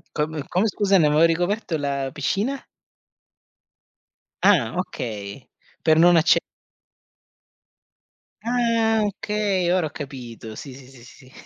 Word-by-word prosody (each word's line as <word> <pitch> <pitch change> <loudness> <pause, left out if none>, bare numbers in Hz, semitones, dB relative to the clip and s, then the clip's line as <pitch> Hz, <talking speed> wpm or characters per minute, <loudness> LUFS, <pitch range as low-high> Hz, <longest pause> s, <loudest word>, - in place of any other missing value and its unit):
Come 150 -1 -2
come 185 +5 +1
scusa 200 -1 +2
ne 160 - +4
avevo 150 +2 +3
ricoperto 175 +1 0
la 140 -2 -2
piscina? 205 - -2 1.8
Ah, 150 - +4
okay. 110 - -5 0.4
Per 160 -1 +3
non 175 +1 +6
acce 165 0 +4 2.0
Ah, 230 -2 +1
okay. 205 -3 -1
Ora 180 -4 +1
ho - - -9
capito. 120 -7 -8
Sì, 140 - -9
sì, 130 -1 -14
sì, 130 -3 -16
sì. 130 +1 -17
160 Hz, 115 wpm, -23 LUFS, 135-200 Hz, 2.0 s, non